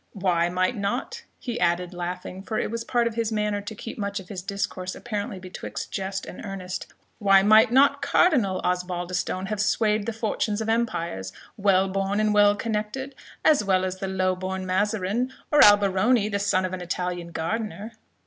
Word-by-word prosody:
Why 180 -4 +1
might 185 +6 0
not" 245 - -3
(he 240 -2 -4
added, 175 +1 +1
laughing, 180 +1 -5
for 215 +2 -4
it - - -1
was 230 0 -3
part 240 0 +1
of 235 - -1
his 230 -1 -1
manner 210 -1 0
to 210 +2 -7
keep 225 +2 -8
much 200 0 -2
of 185 - -12
his 190 -3 -5
discourse 185 -1 -4
apparently 210 -2 -4
betwixt 185 0 -7
jest 190 0 -3
and - - -9
earnest) 190 -3 -5 0.3
"why 195 -2 +5
might 220 +3 +6
not 280 +2 +4
Cardinal 265 - +3
Osbaldistone 180 +1 -2
have 215 -2 -1
swayed 215 0 +1
the - - 0
fortunes 215 -1 -1
of 220 0 -2
empires, 170 - -1 0.2
well 195 -2 +3
born 195 +1 -1
and 215 0 +2
well 205 0 +5
connected, 225 +5 -3 0.3
as 300 -8 +5
well 185 -2 +2
as 185 0 -3
the 195 - -4
low 185 -1 0
born 185 0 -4
Mazarin, 205 +5 0 0.2
or 295 - +7
Alberoni, 205 +2 +5
the 200 -1 -1
son 200 -2 +1
of 185 - -4
an 185 - -4
Italian 180 0 -3
gardener?" 210 +6 -4
200 Hz, 180 wpm, -25 LUFS, 185-220 Hz, 0.3 s, or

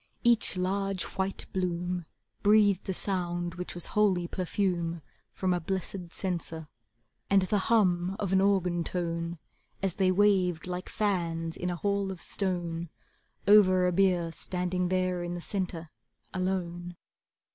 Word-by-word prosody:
Each 235 -5 +3
large 195 +1 -1
white 190 0 -3
bloom 180 -2 -2 0.3
Breathed 205 -2 +4
a - - +1
sound 175 -3 -1
which 180 -1 -6
was 175 - +1
holy 190 -5 +3
perfume 170 -3 -1 0.3
from 185 -1 0
a 175 - 0
blessed 180 0 -4
censer, 170 -4 -3 0.6
And 195 -1 +5
the 200 +3 +1
hum 185 -5 +3
of 195 -2 -2
an 190 - +5
organ 180 -3 +2
tone, 170 -1 -3 0.4
And 195 -1 0
they 185 +1 +2
waved 185 -4 +3
like 180 0 -5
fans 170 -5 -1
in 180 - -3
a 175 - -1
hall 200 +1 0
of 185 - -7
stone 175 -4 -2 0.6
Over 185 -3 +6
a 180 - +3
bier 180 -2 +2
standing 180 +1 -2
there 185 -1 0
in 175 0 -3
the - - -4
centre, 175 -3 -3 0.4
alone. 175 -2 -2
180 Hz, 140 wpm, -29 LUFS, 175-195 Hz, 0.6 s, Over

